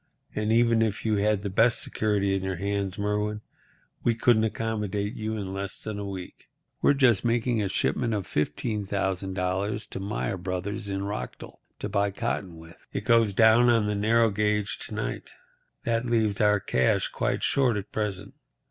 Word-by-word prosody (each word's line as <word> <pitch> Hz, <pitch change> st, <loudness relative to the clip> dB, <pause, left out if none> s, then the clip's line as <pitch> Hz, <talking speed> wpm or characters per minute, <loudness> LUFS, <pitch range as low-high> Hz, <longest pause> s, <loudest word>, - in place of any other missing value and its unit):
And 105 Hz, +1 st, -1 dB
even 115 Hz, 0 st, +4 dB
if 110 Hz, -1 st, -1 dB
you 110 Hz, -1 st, +2 dB
had 105 Hz, 0 st, +1 dB
the 100 Hz, -, -2 dB
best 115 Hz, +4 st, +4 dB
security 100 Hz, -2 st, 0 dB
in 95 Hz, -, 0 dB
your 95 Hz, 0 st, -2 dB
hands, 100 Hz, +1 st, -2 dB
Merwin, 105 Hz, +1 st, -1 dB, 0.6 s
we 115 Hz, -, +2 dB
couldn't 115 Hz, -1 st, +4 dB
accommodate 105 Hz, -2 st, -2 dB
you 110 Hz, 0 st, -3 dB
in 100 Hz, -3 st, -4 dB
less 100 Hz, 0 st, -5 dB
than 105 Hz, -1 st, -4 dB
a 100 Hz, -1 st, -4 dB
week. 95 Hz, -2 st, -8 dB, 0.3 s
We're 145 Hz, -, +4 dB
just 125 Hz, -7 st, +4 dB
making 120 Hz, -1 st, +1 dB
a 100 Hz, -, -1 dB
shipment 115 Hz, +4 st, 0 dB
of 100 Hz, -3 st, -3 dB
$15,000 95 Hz, -, -2 dB
to -, -, -4 dB
Myer 100 Hz, -1 st, -2 dB
Brothers 95 Hz, +3 st, -4 dB
in 95 Hz, 0 st, -2 dB
Rockdell, 100 Hz, +1 st, -6 dB, 0.2 s
to -, -, -4 dB
buy 100 Hz, 0 st, +1 dB
cotton 95 Hz, -3 st, -3 dB
with. 80 Hz, +1 st, -15 dB
It -, -, -4 dB
goes 115 Hz, -4 st, +4 dB
down 115 Hz, +3 st, +6 dB
on 115 Hz, -3 st, +4 dB
the 105 Hz, -, 0 dB
narrow 110 Hz, +2 st, +3 dB
gauge 105 Hz, 0 st, 0 dB
to -, -, -7 dB
night. -, -, -4 dB, 0.5 s
That 115 Hz, +1 st, 0 dB
leaves 110 Hz, -4 st, +1 dB
our 105 Hz, -1 st, +4 dB
cash 65 Hz, -8 st, +1 dB
quite -, -, -1 dB
short 125 Hz, -6 st, +2 dB
at 100 Hz, -, -6 dB
present. 100 Hz, -2 st, -3 dB
105 Hz, 175 wpm, -27 LUFS, 100-110 Hz, 0.6 s, down